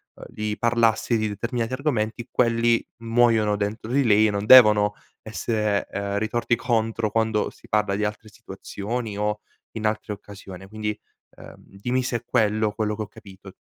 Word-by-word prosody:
ehm, - - -12
di 105 0 -4
parlarsi 115 0 +2
di 110 0 0
determinati 115 +3 -3
argomenti, 120 -5 -2
quelli 115 -1 +2 0.2
muoiono 115 -2 +2
dentro 105 +2 -4
di 140 +1 +2
lei 110 -1 +5
e 105 - 0
non 100 0 -3
devono 105 -4 +7 0.3
essere, 105 -2 -1
ehm, 100 0 -3
ritorti 120 +2 0
contro 115 -2 -1
quando 110 -1 0
si - - -19
parla 105 -2 +1
di 105 - 0
altre 105 +1 -5
situazioni 105 +3 -6
o 105 0 -1 0.3
in 110 -1 -5
altre 110 0 -1
occasioni. 95 -2 -11
Quindi, 105 0 -4 0.4
ehm, - - -13
dimmi 120 +6 -3
se 125 -1 -1
è 120 - -13
quello, 110 -3 +1
quello 105 0 -2
che 110 - -6
ho 105 - -4
capito. 95 -1 -14
110 Hz, 165 wpm, -24 LUFS, 105-115 Hz, 0.4 s, devono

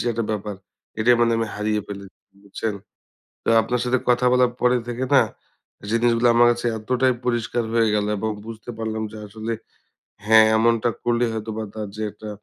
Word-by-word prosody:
যে - - -3
একটা 115 0 -2
ব্যাপার 105 -1 -3 0.5
এটাই 120 +2 +5
মানে 115 0 +3
আমি 115 -1 0
হারিয়ে 105 0 0
ফেলেছি। 100 -1 -9 0.2
বুঝছেন? 100 +1 -4 0.7
তো - - -1
আপনার 125 0 -1
সাথে 125 +1 +2
কথা 125 +1 +3
বলার 125 -1 +3
পরে 125 0 +4
থেকে 120 +2 -3
না - - +7 0.7
জিনিসগুলা 115 +1 +3
আমার 120 0 +6
কাছে 120 0 -2
এতটাই 125 +3 +1
পরিষ্কার 120 -1 0
হয়ে 115 -1 +3
গেল 105 0 +1
এবং 110 +2 -2 0.2
বুঝতে 115 0 -9
পারলাম 110 -1 -3
যে 110 - -9
আসলে 110 +2 -5 0.7
হ্যাঁ, 110 0 +7
এমনটা 115 +1 +2 0.2
করলে 120 0 +2
হয়তো 110 0 -4
বা 110 - -2
তার 110 -2 -5
যে 110 - -4
একটা 110 - -10
115 Hz, 180 wpm, -22 LUFS, 110-120 Hz, 0.7 s, না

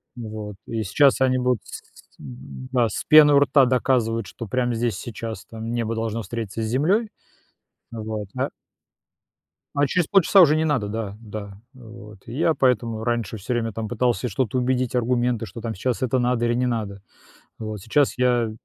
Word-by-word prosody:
Ну 115 -3 -7
вот 105 -1 -7
и 115 -1 -2
сейчас 130 +8 +3
они 130 -1 +3
будут 125 -2 +1
с - - -9 0.2
с - - -23
м-да, 75 - -3
с - - -5
пеной 150 -2 +7
у - - +7
рта 140 -1 +4
доказывать, 120 -4 +1
что 115 - -8
прямо 125 +2 0
здесь 115 0 -1
и - - -9
сейчас 115 -1 -6
там 115 0 -7
небо 115 -1 -1
должно 115 0 -2
встретиться 110 0 -5
с - - -1
землей, 170 - +1 0.8
вот, 110 -3 -5
а - - -1 1.3
А 145 0 +3
через 175 +3 0
полчаса 195 0 +5
уже 155 -3 +6
не 160 0 +1
надо, 130 -9 0
да, 105 -2 -4
да, 105 -2 -8
вот. 115 -4 -13
И 115 - -7
я 165 +4 +2
поэтому 115 -4 +1
раньше 115 -3 -2
всё 110 +6 -4
время 115 -1 -1
там 110 0 -4
пытался 120 +1 0
что-то 120 +2 -1
убедить, 125 0 0
аргументы, 120 -1 0
что 115 +1 -9
там 115 -1 -4
сейчас 120 +5 -2
это 130 0 +1
надо 120 -1 +1
или 120 0 +1
не 125 +1 +1
надо, 105 -5 -3 0.6
вот. 110 -2 -5
Сейчас 130 +8 +1
я 120 -2 +2
120 Hz, 185 wpm, -23 LUFS, 110-130 Hz, 1.3 s, пеной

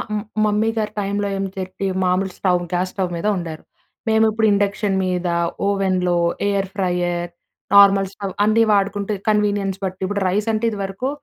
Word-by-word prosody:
మ్ 210 - -2 0.2
mummy 210 +1 +1
గారి 215 -1 -1
టైమ్‌లో 200 0 -1
ఏం 195 0 -2
చెరిపి, 185 +1 -4 0.2
మామూలు 185 +1 +1
స్టవ్, 180 -2 +2
గ్యాస్ 180 +1 0
స్టవ్ 185 -3 -2
మీద 170 - -2
వండారు. 165 -4 -6 0.5
మేము 220 0 +4
ఇప్పుడు 220 0 +1
ఇండక్షన్ 200 0 0
మీద 180 -1 -1 0.4
ఓవెన్‌లో, 185 -3 +1 0.3
ఎయిర్ 195 -1 0
ఫ్రైయర్, 175 -2 -1 0.4
నార్మల్ 200 -1 +6
స్టవ్ 195 -2 -5
అన్నీ 225 +2 +4
వాడుకుంటే 200 +1 0 0.2
కన్వీనియన్స్ 205 -2 +1
బట్టి 185 0 -5
ఇప్పుడు 205 +1 -2
రైస్ 210 +4 0
అంటే 220 +2 0
ఇదివరకు 200 +4 -3
195 Hz, 155 wpm, -20 LUFS, 185-205 Hz, 0.5 s, నార్మల్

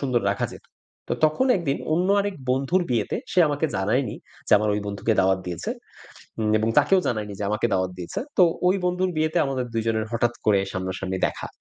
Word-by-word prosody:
সুন্দর 125 -4 +1
রাখা 100 - -2
যেত। - - -12 0.4
তো - - 0
তখন 155 +13 +2
একদিন 145 -6 -1 0.2
অন্য 180 +4 +1
আরেক 200 -1 -2 0.2
বন্ধুর 135 +8 +1
বিয়েতে, 115 -4 0 0.2
সে - - +1
আমাকে 145 +2 0
জানায়নি, 110 +7 0 0.3
যে - - 0
আমার 105 0 0
ওই 105 - -1
বন্ধুকে 100 +2 -1
দাওয়াত 95 0 +3
দিয়েছে। 85 -2 -4 0.7
উম 110 -1 +1
এবং 110 +1 0
তাকেও 190 -1 +5
জানায়নি 105 -3 -2
যে 105 - -2
আমাকে 105 +3 +1
দাওয়াত 95 -1 0
দিয়েছে। 90 - -5 0.2
তো 185 - +7 0.2
ওই 185 - +4
বন্ধুর 180 +1 +1
বিয়েতে 155 +2 +1
আমাদের 130 -2 -2
২ 115 - 0
জনের 110 -1 0
হঠাৎ 120 +1 +1
করে 100 -2 +4
সামনা-সামনি 95 0 -3
দেখা। - - -6
115 Hz, 195 wpm, -24 LUFS, 100-155 Hz, 0.7 s, তো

